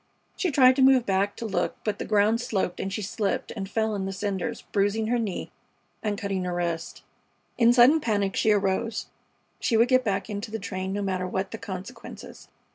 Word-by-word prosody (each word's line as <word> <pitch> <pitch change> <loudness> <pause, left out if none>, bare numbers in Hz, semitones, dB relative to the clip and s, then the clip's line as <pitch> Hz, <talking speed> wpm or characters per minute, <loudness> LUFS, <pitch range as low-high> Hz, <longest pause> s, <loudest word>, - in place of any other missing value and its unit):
She 370 - 0
tried 260 -3 +6
to - - +3
move 260 -2 +6
back 195 +1 +1
to 230 - -6
look, 205 - -1
but 210 - -2
the - - -3
ground 215 +3 +3
sloped 195 -7 -2
and 195 - -3
she 205 +2 -3
slipped 200 +1 -2
and 195 -3 -5
fell 220 0 0
in 195 -2 -2
the - - -3
cinders, 195 -1 -3
bruising 205 +2 +1
her 240 +2 +1
knee 210 -5 -3 0.5
and 210 -2 -1
cutting 195 -2 -2
her 180 -1 -2
wrist. 170 -1 -3 0.6
In 235 0 +6
sudden 250 +6 +6
panic 205 -5 0
she - - +2
arose. 205 +2 0 0.5
She 230 - +1
would 235 +2 +4
get 255 -1 +4
back 200 -4 -1
into 210 +1 -5
the 220 - -3
train, 190 -3 -4
no 205 +1 -2
matter 185 -2 -1
what 190 +1 -3
the 225 - -6
consequences. 190 -1 -9
205 Hz, 200 wpm, -26 LUFS, 195-230 Hz, 0.6 s, tried